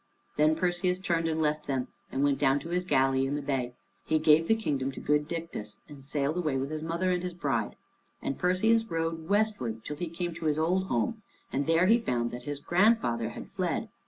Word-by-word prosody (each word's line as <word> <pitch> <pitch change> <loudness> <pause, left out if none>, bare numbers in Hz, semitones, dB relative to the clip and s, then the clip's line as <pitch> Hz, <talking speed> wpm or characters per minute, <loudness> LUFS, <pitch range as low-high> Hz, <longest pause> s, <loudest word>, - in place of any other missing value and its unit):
Then 155 +1 +4
Perseus 180 +1 +1
turned 170 -3 0
and 160 0 -1
left 150 -1 0
them, 130 -2 -1 0.2
and 135 - 0
went 140 -1 +2
down 135 0 +3
to 165 - -8
his 180 +1 0
galley 135 -3 +2
in 140 - -1
the 145 - -2
bay. 130 -3 -2 0.3
He 155 - +1
gave 155 +1 +5
the 225 - +4
kingdom 140 -11 -1
to - - -7
good 150 0 +1
Dictys, 165 -11 -6
and 145 -3 -12
sailed 145 +3 -1
away 155 -6 0
with 135 +2 -3
his 155 0 -3
mother 170 +3 0
and 180 -1 0
his 180 -1 -5
bride. 135 -10 -1 0.4
And 135 - -3
Perseus 220 +6 +3
rowed 165 -3 -3
westward 200 - 0
till 150 - -5
he 175 +1 -3
came 175 +1 -3
to 165 0 -7
his 150 -1 +2
old 180 +4 +1
home, 215 - -1 0.3
and 140 +1 0
there 165 +2 +4
he 225 +5 +5
found 120 - -1
that 120 0 -7
his 145 -1 -4
grandfather 175 - +2
had - - -8
fled. - - -2
155 Hz, 215 wpm, -29 LUFS, 135-180 Hz, 0.4 s, gave